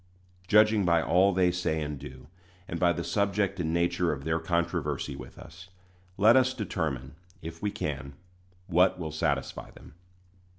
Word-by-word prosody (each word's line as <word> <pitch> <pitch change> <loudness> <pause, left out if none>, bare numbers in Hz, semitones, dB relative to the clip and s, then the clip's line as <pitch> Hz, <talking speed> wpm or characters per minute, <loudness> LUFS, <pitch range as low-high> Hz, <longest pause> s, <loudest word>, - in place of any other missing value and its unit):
Judging 105 0 +5
by 85 -2 +3
all 95 +4 +3
they 90 -1 +2
say 90 -3 -1
and 75 -2 -4
do, 65 +1 -11 0.4
and 85 - -4
by 90 -1 +4
the 85 - -3
subject 100 -1 0
and 80 -2 -1
nature 85 +1 +1
of 70 -2 -5
their 80 +1 0
controversy 85 -3 -2
with - - -11
us, 90 +2 -13 0.5
let 110 +4 +6
us 130 0 +3
determine, 80 - -3 0.3
if 80 +1 -8
we 105 - 0
can, 70 -7 -5 0.5
what 90 +1 +3
will 80 -3 -5
satisfy 80 - -2
them. - - -15
85 Hz, 160 wpm, -28 LUFS, 80-95 Hz, 0.5 s, let